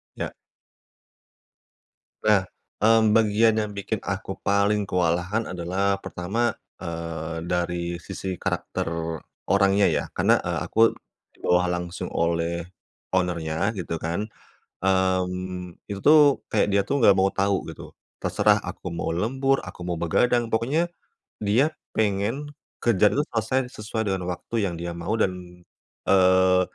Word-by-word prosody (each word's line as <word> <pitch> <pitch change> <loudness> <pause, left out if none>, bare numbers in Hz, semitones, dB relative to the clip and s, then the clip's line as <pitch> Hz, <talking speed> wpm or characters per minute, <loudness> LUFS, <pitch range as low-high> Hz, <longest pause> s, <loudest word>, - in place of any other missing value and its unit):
Ya. - - -4 1.9
Nah, 105 -2 +5 0.4
mmm, 110 0 +5
bagian 110 0 +4
yang 105 -1 -4
bikin 100 - -3
aku - - -4
paling 100 0 +2
kewalahan 90 +4 +1
adalah 95 +3 -1
pertama, 105 +7 -1 0.3
eee, 85 -1 -5
dari 85 0 -1 0.2
sisi 95 +2 -5
karakter, - - -2 0.6
orangnya 100 +1 +4
ya - - 0
karena, - - +3
eee, - - -2
aku, - - -4 0.5
dibawah 90 0 +1
langsung 90 0 -3
oleh, 85 0 -1 0.5
owner-nya 90 0 0
gitu 85 -2 -3
kan, 85 +3 -2 0.6
mmm, 95 -1 0 0.2
itu 100 - -4
tuh 155 +1 +9 0.3
kayak - - +2
dia 100 0 +4
tuh - - 0
enggak 100 - +7
mau 95 - +4
tau 100 0 +1
gitu, - - -9 0.3
terserah - - +3
aku - - -7
mau 85 - -2
lembur, 130 +10 +1
aku - - -10
mau 90 -1 -2
begadang 120 +8 +2
pokoknya, 135 +10 +1 0.5
dia 115 +9 +2 0.2
pengen, 110 +8 0 0.3
kerjaan 105 -3 +4
itu 145 - +2
selesai 115 +3 +1 0.2
sesuai 105 +1 -3
dengan 95 -2 -2
waktu 100 - -9
yang 90 - -4
dia 85 +1 -4
mau 85 +5 -2
dan, 90 -2 -3 0.5
eee, 95 -1 +5
95 Hz, 130 wpm, -25 LUFS, 90-105 Hz, 1.9 s, tuh